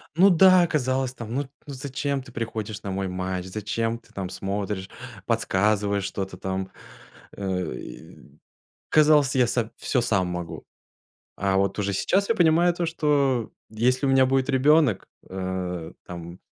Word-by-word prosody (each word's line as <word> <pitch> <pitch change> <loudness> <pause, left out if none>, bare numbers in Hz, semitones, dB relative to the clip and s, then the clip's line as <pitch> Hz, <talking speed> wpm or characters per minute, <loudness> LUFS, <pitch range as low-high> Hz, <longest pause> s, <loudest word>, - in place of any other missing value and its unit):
Ну 190 +4 +6
да. 185 0 +6
Казалось 130 -4 0
там, 115 -3 -7
ну 140 - 0
т 135 - -15 0.2
ну 140 - -6
зачем 140 +1 -3
ты 130 - -14
приходишь 110 -2 -4
на 100 - -4
мой 95 0 -2
матч, 90 0 -3
зачем 110 +4 -2
ты - - -25
там 95 -2 -4
смотришь, 100 0 -4 0.4
подсказываешь 100 0 +1
что-то 95 -1 -4
там? 95 0 -4 0.7
Э, 95 -4 -2
и 70 0 -12 0.5
казалось 150 -3 +4
я 125 -2 +4
са 115 -1 -1
всё 125 - 0
сам 100 -6 +1
могу. 90 -1 -6 0.7
А 95 0 +1
вот 100 +1 +1
уже 100 -1 0
сейчас 195 - +1
я 230 - +3
понимаю, 170 -1 +4
то 175 0 -1
что, 140 -7 +1 0.2
если 125 +5 +1
у - - +3
меня 135 -1 +5
будет 135 0 +1
ребёнок. 140 - +3 0.2
Э, 90 -3 -4
там, 85 0 -8
110 Hz, 155 wpm, -25 LUFS, 95-140 Hz, 0.7 s, Ну